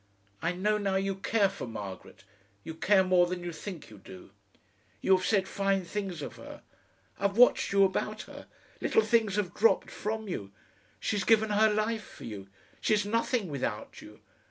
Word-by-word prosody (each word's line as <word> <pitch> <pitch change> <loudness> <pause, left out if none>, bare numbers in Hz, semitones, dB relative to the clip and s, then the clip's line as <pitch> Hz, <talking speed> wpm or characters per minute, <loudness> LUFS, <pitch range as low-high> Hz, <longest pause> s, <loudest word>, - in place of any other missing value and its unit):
I 170 - 0
know 210 +4 0
now 195 -2 0
you 195 0 0
care 200 +2 +1
for 195 -9 -7
Margaret 100 -5 -8 0.4
you 160 - -6
care 190 +4 +3
more 180 -1 +4
than 180 0 -4
you 175 - -4
think 165 - -8
you 105 - -13
do. 95 -1 -13 0.7
You 190 - +4
have 185 - -2
said 195 -3 +2
fine 195 -2 0
things 185 -4 -4
of - - -7
her. - - -11 0.6
I've 200 +1 0
watched 245 +1 +5
you 200 0 +5
about 210 +3 -1
her. - - -12 0.3
Little 445 - +3
things 220 -4 +2
have 205 -4 -1
dropped 225 - +2
from 220 0 -4
you. 100 - -5 0.5
She's 205 -2 -1
given 220 +1 +3
her 215 +1 +4
life 215 +1 -1
for - - -13
you; 100 -4 -7 0.3
she's 210 -2 +2
nothing 230 0 0
without 125 -8 -4
you. - - -14
195 Hz, 180 wpm, -29 LUFS, 175-210 Hz, 0.7 s, watched